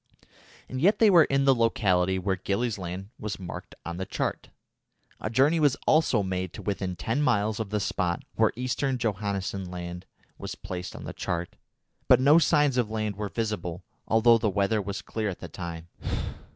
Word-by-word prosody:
And 130 0 -4
yet 200 +6 +5
they 220 -3 +6
were 170 -4 +7
in 135 0 +1
the 135 - +6
locality 95 -6 +2
where 95 +1 0
Gillies 100 +4 -1
Land 95 +3 -6
was 105 -1 -4
marked 90 -3 -8
on 85 0 -4
the 95 - -3
chart. - - -3 0.7
A - - -3
journey 135 +8 +3
was 145 -4 +3
also 155 -9 +3
made 95 -1 -3
to - - -8
within 95 -3 -2
ten 115 - -1
miles 110 -6 +1
of 110 -3 -3
the 105 +1 0
spot 90 -3 -1
where 110 -1 +3
Eastern 125 +2 -1
Johannessen 100 -4 -2
Land 90 0 -7 0.3
was 100 -2 -5
placed 90 -2 -6
on - - -8
the - - -6
chart, 85 0 -3 0.5
but 125 - +7
no 145 +5 +6
signs 150 -5 +3
of 120 -4 +1
land 110 -2 -2
were 105 0 -4
visible, 100 -6 -3 0.2
although 115 +1 +5
the 110 - +1
weather 100 +2 +1
was 100 0 -5
clear 110 -2 -2
at 95 - -5
the - - -7
time. 85 -2 -7
105 Hz, 185 wpm, -27 LUFS, 95-120 Hz, 0.7 s, were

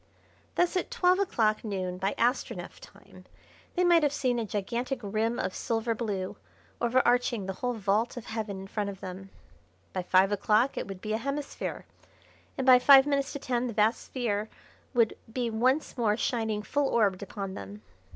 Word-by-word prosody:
Thus 355 +1 +2
at 365 - -1
twelve 370 -6 +3
o'clock 220 - +1
noon 185 -4 -3
by 195 +1 -1
Astronef 245 +2 -1
time - - -16 0.5
they 360 - +2
might 345 -2 +5
have 295 -2 +2
seen 255 -4 0
a 230 - -2
gigantic 235 +7 -2
rim 220 +3 -1
of 185 - -2
silver 230 0 -1
blue 205 -5 -3 0.4
overarching 240 -3 +2
the 190 - -3
whole 245 -1 0
vault 215 +3 0
of 245 - -6
heaven 215 -4 -4
in - - -8
front 205 +1 -3
of 195 -2 -8
them. 190 +1 -8 0.6
By 185 - -1
five 185 +2 +3
o'clock 215 +5 +2
it - - -4
would 195 -2 -8
be 215 0 -3
a 220 - 0
hemisphere, 275 +3 -4 0.7
and 265 - -1
by 255 -1 +8
five 270 +1 +8
minutes 280 -1 0
to - - -3
ten 250 -2 -1
the 235 - -4
vast 215 +3 +2
sphere 220 -4 -2 0.5
would 230 -2 +3 0.2
be 240 -1 -2
once 255 +7 +1
more 220 -4 +1
shining 220 -4 -1
full 285 +5 0
orbed 205 -7 +2
upon 200 -1 -5
them. 100 - -9
225 Hz, 180 wpm, -28 LUFS, 200-255 Hz, 0.7 s, by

